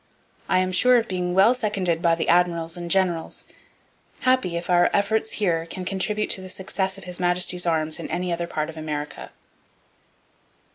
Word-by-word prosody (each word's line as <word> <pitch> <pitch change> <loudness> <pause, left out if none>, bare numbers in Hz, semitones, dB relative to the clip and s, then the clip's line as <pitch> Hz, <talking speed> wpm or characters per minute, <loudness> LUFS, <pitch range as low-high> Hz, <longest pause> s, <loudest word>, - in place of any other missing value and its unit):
I - - +3
am 185 0 +1
sure 250 +7 +5
of 230 - 0
being 180 -1 -2
well 195 +6 +6
seconded 195 -8 -1
by 170 -1 +3
the 165 - -3
admirals 170 -1 +2
and 175 -1 -6
generals; 180 -3 0 0.8
happy 255 -9 +1
if 170 - -5
our 175 -1 +4
efforts 220 +2 0
here 170 -5 0
can 185 +2 -7
contribute 200 +3 -1
to 190 - +1
the 185 - -9
success 190 +1 -2
of 195 - -11
His 180 -1 -7
Majesty's 180 0 +1
arms 160 -1 0
in 165 - -6
any 180 0 -2
other 170 0 -3
part 155 -1 -3
of 160 - -16
America. 150 -1 -5
180 Hz, 180 wpm, -23 LUFS, 170-190 Hz, 0.8 s, well